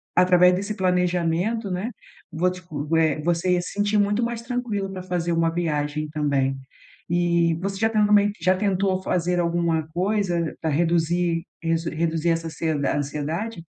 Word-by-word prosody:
através 180 0 +5
desse 200 +3 -3
planejamento, 180 +3 0
né, 190 +7 -3 0.4
vou 175 +3 +1
te 180 0 -9
con 150 -3 -6
eh, 155 -2 +2
você 175 +2 +1
ia 175 - +2
se - - -6
sentir 205 +1 +1
muito 205 +3 +1
mais 235 -1 -2
tranquila 235 -5 -3
pra 185 -1 -6
fazer 175 -2 -2
uma 165 0 +2
viagem 150 -3 -1
também. 140 -3 0 0.6
E 170 -1 +2
você 195 0 -3
já 225 0 +3
tentou 210 -1 +3
meio 205 0 +5
já 185 0 +3
tentou 190 -1 0
fazer 180 0 0
alguma 170 -2 0
coisa 180 -2 0
pra 160 - -1
reduzir 170 +1 +1 0.2
resu 165 0 0
reduzir 165 +1 -1
essa 165 0 0
ansie 160 +1 -3
a 145 -1 0
ansiedade? 155 +8 -3
175 Hz, 165 wpm, -24 LUFS, 165-195 Hz, 0.6 s, através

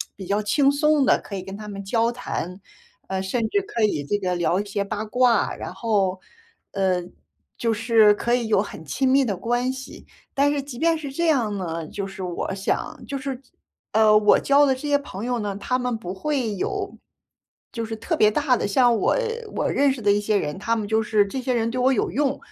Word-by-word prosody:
比 195 - -8
较 205 +1 +1
轻 275 +7 +3
松 300 0 +3
地 - - +4
可 200 - -8
以 185 - -5
跟 195 +1 -8
他 210 -1 -8
们 200 -1 -6
交 230 +3 +1
谈， 190 -6 -5 0.5
呃， 190 0 -2
甚 220 +4 -1
至 405 - +1
可 235 - -2
以 175 -9 +1
这 205 +8 -1
个 185 -2 -1
聊 175 +2 +1
一 205 - -3
些 200 0 -2
八 210 +1 -4
卦， 240 0 +2
然 - - -7
后， 195 -5 0 0.5
呃， 185 -3 +1 0.5
就 230 -1 0
是 220 -1 +5
可 240 +3 0
以 240 -2 -1
有 210 -3 +3
很 160 -6 -8
亲 260 - 0
密 270 +1 +4
的 205 -5 -1
关 245 +4 0
系。 265 0 -10 0.3
但 280 +1 +3
是 285 - -1
即 270 -3 -9
便 330 0 +3
是 290 -3 -6
这 340 +5 -1
样 230 -9 +1
呢， 165 -3 -4
就 200 - -5
是 195 0 -9
我 180 +1 -3
想 195 0 -3
就 280 - -3
是 265 -1 -5 0.5
呃， 215 -1 +5
我 210 -1 +5
交 285 +1 +4
的 265 - +2
这 260 - -11
些 285 0 +3
朋 220 -6 -7
友 245 -1 -1
呢， 205 -2 -3
他 250 +5 -1
们 245 -2 -1
不 185 -5 -6
会 245 0 -2
有 185 - -3 0.8
就 230 -2 -3
是 225 0 -5
特 330 +8 -2
别 215 -5 +5
大 270 -1 +2
的。 - - -1
像 240 +3 +4
我 - - +2 0.4
我 - - 0
认 285 0 +3
识 260 -3 -5
的 205 - +3
一 205 - +3
些 210 +1 0
人， 150 -5 -3
他 230 +3 0
们 215 - -2
就 220 0 +2
是 210 -1 +3
这 260 +6 -4
些 255 0 -1
人 230 -1 0
对 255 - -3
我 260 +1 +4
有 215 - 0
用， 280 +1 0
225 Hz, 245 characters per minute, -23 LUFS, 200-260 Hz, 0.8 s, 是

